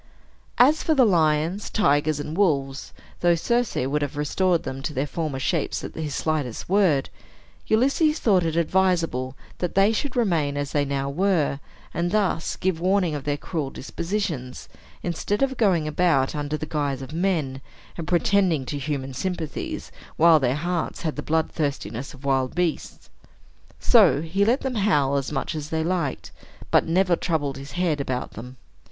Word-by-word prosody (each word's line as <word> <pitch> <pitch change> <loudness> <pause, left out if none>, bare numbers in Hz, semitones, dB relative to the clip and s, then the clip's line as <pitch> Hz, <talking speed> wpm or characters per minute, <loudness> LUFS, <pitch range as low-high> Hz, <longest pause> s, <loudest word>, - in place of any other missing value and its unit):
As 285 +6 +5
for 315 - +1
the 260 -3 +6
lions, 165 0 +1
tigers, 150 -6 +2
and 150 +2 -5
wolves 140 -8 0 0.3
(though 175 -1 +4
Circe 240 +7 0
would 140 +4 0
have 145 0 -3
restored 170 +4 +1
them 130 +1 -5
to 150 +2 -4
their 135 - 0
former 150 -2 -3
shapes 130 - -1
at - - -6
his 155 -3 -4
slightest 150 -7 -2
word), 180 -8 +2 0.6
Ulysses 275 +7 +3
thought 195 - +3
it 165 -1 -1
advisable 170 -7 +1 0.2
that 180 - -2
they 195 +2 +5
should 270 +4 -2
remain 165 - +1
as 145 -1 -3
they 145 -1 +1
now 140 0 -2
were, 155 -2 +1 0.3
and 170 +1 0
thus 195 -5 0
give 185 -3 -1
warning 185 -2 +2
of 145 -2 -5
their 145 0 0
cruel 150 -3 -3
dispositions, 165 -5 -4 0.4
instead 190 +7 -1
of 265 -1 0
going 185 -10 +2
about 155 -4 +2
under 150 +1 -2
the 155 - -4
guise 145 -3 -2
of 135 - -9
men, 160 -7 -1 0.3
and 165 -3 -6
pretending 175 -4 +2
to 145 +2 -4
human 135 -2 -3
sympathies, 165 +1 -4 0.3
while 165 -1 +6
their 130 -1 +1
hearts 175 +3 -2
had 160 -3 -2
the 150 - -4
blood 160 +1 0
thirstiness 140 -4 -3
of 135 +1 -15
wild 135 -1 +1
beasts. 175 -3 -2 0.7
So 175 - +5
he 190 +5 +1
let 240 +5 +2
them 265 -1 -2
howl 145 -9 +2
as 135 0 -3
much 145 - -2
as 155 -1 -5
they 160 0 -1
liked, 170 -5 -2 0.4
but - - +4
never 180 +1 +3
troubled 150 -6 -2
his 140 +1 -9
head 175 -5 0
about 130 -2 -3
them. 125 +4 -10
160 Hz, 170 wpm, -24 LUFS, 140-185 Hz, 0.7 s, the